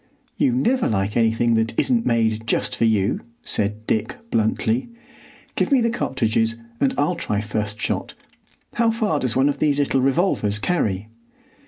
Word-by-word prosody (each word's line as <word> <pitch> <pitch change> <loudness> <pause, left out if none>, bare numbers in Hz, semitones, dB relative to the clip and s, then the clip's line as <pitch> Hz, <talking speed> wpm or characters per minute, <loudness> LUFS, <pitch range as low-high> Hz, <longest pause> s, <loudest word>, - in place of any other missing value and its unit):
"You 280 -3 +2
never 250 0 +1
like 100 -1 -1
anything 115 0 +2
that 115 0 0
isn't 235 -3 +2
made 115 -1 +1
just - - 0
for - - +1
you," 105 -3 +1 0.2
said 105 +1 -2
Dick 110 -1 -1
bluntly. 110 - 0 0.7
"Give - - 0
me 275 - +5
the 230 -1 +1
cartridges, 115 - 0 0.2
and 140 - +1
I'll 145 +5 +2
try 105 -11 -2
first 105 0 -3
shot. - - -2 0.6
How 230 -1 +2
far 220 -9 0
does 130 -4 -1
one 135 +2 +3
of 145 -1 -1
these 145 -2 +2
little 135 -2 +1
revolvers 135 - +1
carry?" 110 - -1
115 Hz, 160 wpm, -22 LUFS, 110-155 Hz, 0.7 s, me